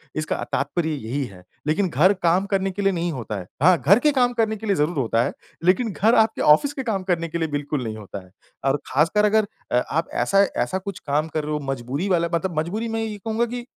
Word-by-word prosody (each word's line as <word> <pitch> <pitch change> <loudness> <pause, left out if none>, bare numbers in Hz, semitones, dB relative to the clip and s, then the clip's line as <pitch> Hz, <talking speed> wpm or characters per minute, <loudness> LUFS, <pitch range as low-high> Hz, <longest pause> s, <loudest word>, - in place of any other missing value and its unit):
इसका 155 0 -2
तात्पर्य 150 +4 -1
यही 135 +1 -3
है। 95 -6 -13 0.2
लेकिन 180 +5 +1
घर 170 +7 +4
काम 175 +3 +3
करने 195 -1 0
के 195 +2 -4
लिए 195 0 +3
नहीं 170 -1 -1
होता 120 -6 -5
है। 90 - -9 0.2
हाँ, 180 +1 +6
घर 195 +10 +5
के 300 +2 +3
काम 245 -3 +2
करने 220 -2 +1
के 220 - -8
लिए 200 - +2
ज़रूर 155 +1 0
होता 115 -3 +1
है, - - -2 0.3
लेकिन 190 +6 +2
घर 220 +5 +3
आपके 220 0 +3
ऑफ़िस 155 - +5
के 270 - -4
काम 210 -6 -2
करने 175 -3 0
के 170 - -3
लिए 160 - -1
बिल्कुल 145 -1 -2
नहीं 110 -2 -5
होता 100 -2 -8
है। 90 - -22 0.3
और 135 +1 +3
ख़ासकर 165 +10 +3
अगर 210 0 +3 0.2
अ, - - +3
आप 160 +6 -2
ऐसा 195 0 +4 0.2
ऐसा 190 - -2
कुछ 195 +1 -6
काम 150 +3 +1
कर 155 -1 -3
रहे 150 +1 -3
हो 150 - -1
मजबूरी 135 +8 -3
वाला, 170 -2 +2
मतलब 170 -1 0
मजबूरी 210 +9 -2
में 225 0 -2
ये 215 -2 -4
कहूँगा 225 +3 -1
कि। 240 +1 -6
175 Hz, 245 wpm, -23 LUFS, 145-210 Hz, 0.3 s, हाँ